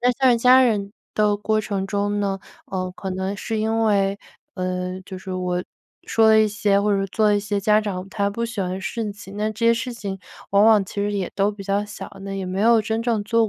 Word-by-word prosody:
那 245 +1 +3
像 250 -1 +3
家 255 +2 +7
人 205 -4 +1 0.2
的 210 -1 +2
过 215 +1 0
程 200 -2 -3
中 205 0 0
呢， 195 -1 -1 0.3
呃， 185 -1 -3
可 190 -1 -5
能 190 +2 -3
是 220 +2 -3
因 220 +1 0
为， 200 -2 +2 0.4
呃， 185 0 -3
就 190 -1 -8
是 190 0 -7
我 180 -1 -2 0.4
说 225 -1 +3
了 220 - +6
一 215 - +4
些， 205 -1 +1
或 205 -1 +2
者 195 - 0
做 215 +3 +1
了 210 -1 +4
一 - - 0
些 205 0 -2
家 210 +2 +3
长 195 -3 -4
他 200 0 -1
不 235 +3 -2
喜 225 -3 -5
欢 185 +1 -2
事 215 +2 -3
情， 205 0 -11 0.2
这 230 +2 -1
些 230 - +6
事 240 +2 -3
情 200 -4 -5 0.3
往 200 +1 +5
往 215 -3 +6
其 - - -12
实 205 +1 0
也 195 -3 -2
都 200 +1 +2
比 205 -1 -9
较 200 +1 0
小， 205 0 -8
那 195 - -5
也 190 -1 -4
没 185 +2 -2
有 230 0 +5
真 220 +2 -2
正 230 -3 0
做 230 0 +2
205 Hz, 255 characters per minute, -22 LUFS, 195-220 Hz, 0.4 s, 家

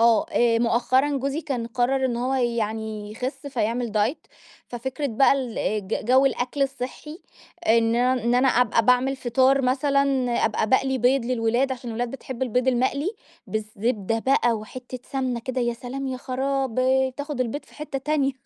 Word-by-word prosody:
آه، 230 -1 +4
آآ 235 -1 +3
مؤخرًا 255 +4 +2
جوزي 275 +3 -2
كان 265 -7 -3
قرّر 250 +3 0
إن 245 -2 0
هو 250 +3 -1
يعني 220 -4 -2
يخس 255 +6 -5
فيعمل 235 -3 -1
Diet، 215 +8 0 0.4
ففكرة 265 +4 -4
بقى 270 +1 +4
ال 260 -4 -2 0.3
ج 225 - -2
جو 260 +4 +5
الأكل 270 +1 -1
الصحّي 275 +4 -5 0.5
إن 225 0 +4
ان 250 +1 +2
إن 235 +2 +1
أنا 255 +2 +4
أبقى 245 -2 +3
باعمل 255 +2 +3
فطار 260 +2 +2
مثلًا، 275 +2 +2 0.4
أبقى 215 - 0
باقلي 265 +1 +2
بيض 250 +1 +3
للولاد 245 +2 +1
عشان 245 -2 -6
الولاد 235 +1 -2
بتحب 260 -1 -6
البيض 250 +1 +1
المقلي، 260 +7 +1 0.4
بالزبدة 215 0 -2
بقى 240 0 +2
وحتّة 250 +3 -7
سمنة 260 -3 -1
كده 255 +2 -3
يا 240 -1 0
سلام 260 +3 -6
يا 260 -1 -3
خرابي، 260 0 0
بتاخد 285 +1 -5
البيض 255 +4 -2
في - - -21
حتّة 300 -2 -5
تانية. 275 0 0
255 Hz, 165 wpm, -24 LUFS, 235-270 Hz, 0.5 s, جو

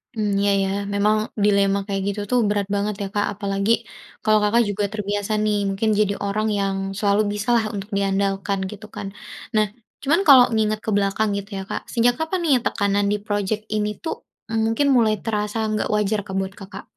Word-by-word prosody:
Mmm, 210 -2 0
iya 200 - +3
ya - - -1 0.2
memang 210 +2 +3 0.3
dilema 200 -1 +3
kayak 195 -1 -2
gitu 200 +1 -2
tuh 250 - +3
berat 205 -1 0
banget 205 0 -1
ya, 200 - -2
Kak, 205 - +2
apalagi 200 +1 -1 0.5
kalau 215 0 +4
Kakak 230 +3 +4
juga 205 +1 -1
terbiasa 205 0 -3
nih 210 -1 +1
mungkin 205 +3 0
jadi 200 -1 +2
orang 215 +2 0
yang 195 -1 0 0.2
selalu 205 0 +2
bisalah 225 +2 +1
untuk 195 +1 -5
diandalkan 195 0 0
gitu 210 +1 -10
kan. 195 - -5 0.5
Nah 215 0 +4 0.4
cuman 315 +6 +3
kalau 260 -3 +9
ngingat 215 -1 +1
ke - - -2
belakang 205 +2 +1
gitu 200 +1 -6
ya, 190 - -4
Kak, - - -3
sejak 240 +1 +3
kapan 320 +3 -1
nih 300 -4 +3
tekanan 200 -1 +1
di 210 - +1
project 205 +1 -1
ini 210 0 0
tuh, 325 - -1 0.4
mmm, 225 - +1
mungkin 255 +6 +1
mulai 215 -2 +3
terasa 210 -1 -2 0.2
gak - - -1
wajar, 210 0 +1
Kak, 190 - -5
buat 190 0 -3
Kakak? 195 +1 -9
210 Hz, 190 wpm, -22 LUFS, 200-220 Hz, 0.5 s, kalau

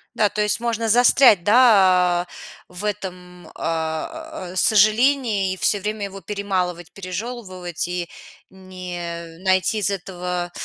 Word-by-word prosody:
Да, 210 -2 +2
то 210 - -2
есть 210 +1 0
можно 230 -1 -2
застрять, 240 -4 +6
да, 190 -6 +5
а, - - -30 0.4
в 180 +3 -8
этом, 180 -3 -6
э, 165 - -4
сожалении 215 0 +3
и - - -8
всё 205 - +1
время 210 +1 -3
его 195 0 -9
перемалывать, 180 -3 -3
пережёвывать 185 -3 -6
и 175 -1 -4 0.4
не 175 -3 -8
найти 190 +3 +2
из 200 - +2
этого 180 -2 -4
190 Hz, 125 wpm, -21 LUFS, 180-210 Hz, 0.4 s, застрять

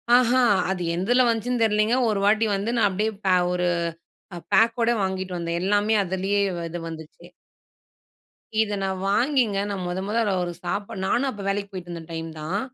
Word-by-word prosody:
ஆஹ, 245 -1 +4 0.4
அது 185 -2 -3
எதில 245 +9 +3
வந்துச்சுன்னு 235 +1 0
தெரியலைங்க 215 +1 +2
ஒரு 210 -2 0
வாட்டி 215 +2 +3
வந்து 200 +3 -2
நான் 225 -3 +4
அப்படியே 210 +3 0 0.2
பே 190 - +4 0.2
ஒரு 180 0 0 0.9
பேக்கோட 230 +3 +4
வாங்கிட்டு 190 -1 -3
வந்தேன். 170 0 -2
எல்லாமே 205 +3 +2
அதிலேயே 190 +2 -1 0.3
இது 175 +1 -5
வந்துச்சு. 160 -1 -10 1.3
இத 210 -1 -1
நான் 190 -1 -2
வாங்கிங்க, 240 -2 +2
நானும் 190 -3 -3
மொதொ 180 +2 -3
மொதொ 225 +3 0 0.2
அவருக்கு 175 0 -4
சாப்பாடு 200 +1 -3
நானும் 270 +7 +1
அப்போ 205 -6 -7
வேலைக்கு 200 0 -1
போயிட்டு 180 -2 -8
இருந்த 170 -1 -6
டைம் 165 0 -5
தான். 180 +7 -2
200 Hz, 160 wpm, -24 LUFS, 180-220 Hz, 1.3 s, ஆஹ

